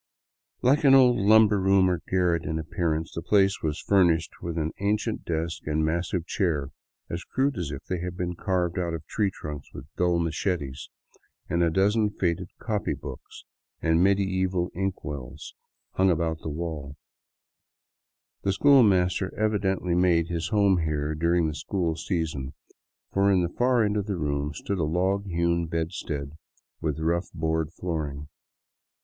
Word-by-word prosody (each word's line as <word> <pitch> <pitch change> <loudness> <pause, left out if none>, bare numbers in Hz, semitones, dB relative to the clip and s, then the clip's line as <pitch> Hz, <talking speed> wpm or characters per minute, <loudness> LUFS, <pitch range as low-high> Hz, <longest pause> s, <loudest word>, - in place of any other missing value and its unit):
Like 140 +5 +4
an 135 -1 +7
old 125 -2 +6
lumber 105 0 +5
room 95 0 +4
or 90 -3 0
garret 90 -3 +2
in 80 +1 -2
appearance, 80 0 -2
the 85 - -4
place 100 0 +2
was 80 0 -2
fur 100 -2 +4
nished 80 -2 +1
with 85 -1 -4
an 80 0 -1
ancient 105 +2 -1
desk 80 0 -2
and 75 0 0
a - - +2
massive 85 +1 -1
chair, 80 -8 -1 0.4
as 85 +2 -5
crude 140 +1 0
as 85 -7 -3
if 65 -1 -6
they 90 - -3
had 90 0 -5
been 90 -1 -2
carved 90 0 -1
out 85 -2 -1
of 80 -1 -8
tree 105 +4 0
trunks 75 -5 -8
with 65 - -8
dull 90 -1 +2
machetes, 80 -4 -2 0.6
and 85 - 0
a 85 - +4
dozen 105 +5 +2
faded 90 -3 -2
copy 105 -3 -2
books - - -10 0.3
and 80 +1 +2
medieval 95 -2 +1
inkwells 75 -8 -5 0.4
hung 95 0 +2
about 80 -2 0
the - - -4
walls. 75 -2 -5 1.5
The 95 - 0
school 140 +6 +6
master 95 -3 +2
evidently 95 -4 0
made 85 -2 +3
his 85 -1 -2
home 100 -4 +3
here 75 -2 -1
during 85 +2 +2
the 75 - -2
school 85 +1 -2
season, 80 -7 -3 0.6
for 100 +1 +3
in 95 -2 +3
the 85 - -1
far 125 -1 +3
end 105 0 0
of 100 0 -2
the 100 -3 -2
room 75 -2 -1
stood 100 +5 -3
a - - +1
log 95 +6 0
hewn 85 -1 0
bedstead 80 -3 -3 0.5
with 80 -2 -1
a 80 - -3
rough 85 +2 0
board 80 -1 -1
flooring. 75 -5 -4
85 Hz, 165 wpm, -26 LUFS, 80-95 Hz, 1.5 s, an